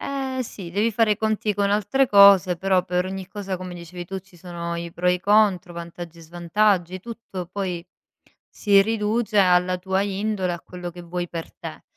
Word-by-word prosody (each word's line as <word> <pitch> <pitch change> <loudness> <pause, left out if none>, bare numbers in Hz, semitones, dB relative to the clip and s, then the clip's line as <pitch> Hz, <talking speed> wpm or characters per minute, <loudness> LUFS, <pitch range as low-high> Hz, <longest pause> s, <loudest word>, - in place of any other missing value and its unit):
Eh, 265 -2 -3
sì. 190 -6 -9
Devi 210 +5 +1
fare 220 0 +3
i - - -2
conti 220 0 0
con 200 0 +1
altre 215 +7 +2
cose, 200 -3 +7
però 185 0 +1
per 180 0 0
ogni 190 0 -5
cosa 195 -1 -5
come 180 0 -7
dicevi 175 +1 -8
tu 190 +2 -5
ci 185 -1 -22
sono 170 -1 -5
i 170 0 -6
pro 180 +1 0
e 180 - +4
i 180 - -5
contro, 200 -4 +3
vantaggi 170 0 -8
e - - -12
svantaggi, 175 +2 0
tutto 220 -4 -7
poi, 185 -3 -3 0.6
si 200 -2 +3
riduce 215 +1 0
alla 180 -1 +4
tua 190 +1 0
indole 200 -2 -1
a 175 - -5
quello 180 0 -8
che 175 +1 -11
vuoi 175 +1 -4
per 165 -1 -7
te. - - -9
185 Hz, 195 wpm, -23 LUFS, 175-205 Hz, 0.6 s, cose